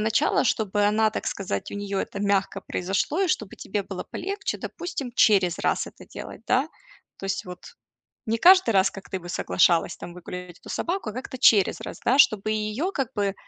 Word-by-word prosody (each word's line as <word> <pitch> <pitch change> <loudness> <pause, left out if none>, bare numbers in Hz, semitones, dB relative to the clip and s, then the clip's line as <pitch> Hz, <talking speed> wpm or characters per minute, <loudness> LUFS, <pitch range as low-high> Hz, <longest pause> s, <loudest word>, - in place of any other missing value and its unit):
начала, 220 +1 +2
чтобы 210 -3 +1
она, 215 +1 +3
так - - -5
сказать, 140 - -3
у - - -6
неё 200 -1 -3
это 200 - -5
мягко 200 -1 0
произошло 195 - -1
и 380 - +1
чтобы 215 - -1
тебе 205 +1 -3
было 190 -1 -6
полегче, 395 +3 -3
допустим, 280 -9 -5
через 190 -5 +4
раз - - 0
это - - -12
делать, - - -8
да? 265 +5 +2 0.5
То 195 - -7
есть, 195 - -2
вот 180 -1 -8 0.7
не 225 +1 +1
каждый 370 -1 +7
раз, 195 -2 +3
как 195 - -11
ты 190 - -3
бы 175 0 -10
соглашалась, 170 -1 +2
там, 175 - -9
выгулять 180 0 -9
эту - - -13
собаку, 350 - -2
а - - -7
как-то 255 +1 -6
через 210 -6 +4
раз, - - -7
да? 260 +3 +3
Чтобы 215 -4 +4
и 215 - +1 0.3
её 375 - 0
как 270 -8 -1
бы 200 -2 0
205 Hz, 200 wpm, -25 LUFS, 190-250 Hz, 0.7 s, каждый